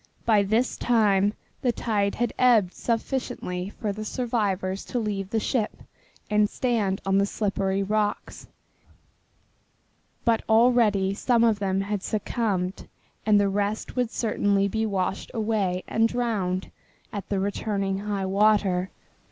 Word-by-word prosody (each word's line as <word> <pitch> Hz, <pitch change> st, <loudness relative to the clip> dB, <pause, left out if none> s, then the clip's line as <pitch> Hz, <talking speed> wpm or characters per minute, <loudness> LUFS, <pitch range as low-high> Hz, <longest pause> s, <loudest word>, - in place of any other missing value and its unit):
By 215 Hz, -3 st, +4 dB
this 220 Hz, +6 st, +1 dB
time 205 Hz, -3 st, +2 dB, 0.3 s
the 250 Hz, -, +2 dB
tide 205 Hz, -4 st, -1 dB
had 240 Hz, -1 st, -1 dB
ebbed 225 Hz, -8 st, +4 dB
sufficiently 225 Hz, -6 st, -3 dB
for 210 Hz, 0 st, -4 dB
the 215 Hz, +2 st, -6 dB
survivors 205 Hz, -5 st, -1 dB
to 250 Hz, -, -4 dB
leave 205 Hz, -4 st, -2 dB
the 225 Hz, -, 0 dB
ship 220 Hz, 0 st, -2 dB, 0.4 s
and 210 Hz, 0 st, +3 dB
stand 215 Hz, -6 st, 0 dB
on 195 Hz, 0 st, +3 dB
the 200 Hz, -, +2 dB
slippery 195 Hz, -2 st, -1 dB
rocks, 210 Hz, +1 st, -2 dB, 1.8 s
but 230 Hz, -2 st, +3 dB
already 220 Hz, -4 st, +4 dB
some 235 Hz, +3 st, +2 dB
of 225 Hz, -3 st, +3 dB
them 195 Hz, -1 st, 0 dB
had 200 Hz, 0 st, -2 dB
succumbed 200 Hz, -3 st, -2 dB, 0.4 s
and 210 Hz, -1 st, +6 dB
the 200 Hz, -, +3 dB
rest 205 Hz, +2 st, -2 dB
would 250 Hz, -3 st, +1 dB
certainly 205 Hz, -4 st, +1 dB
be 220 Hz, +2 st, -1 dB
washed 195 Hz, -1 st, -2 dB
away 210 Hz, -5 st, 0 dB
and 225 Hz, 0 st, +2 dB
drowned 210 Hz, -6 st, -2 dB, 0.4 s
at 205 Hz, -2 st, -4 dB
returning 200 Hz, 0 st, -1 dB
high 200 Hz, -1 st, -2 dB
water. 195 Hz, -2 st, +2 dB
205 Hz, 130 wpm, -25 LUFS, 195-225 Hz, 1.8 s, and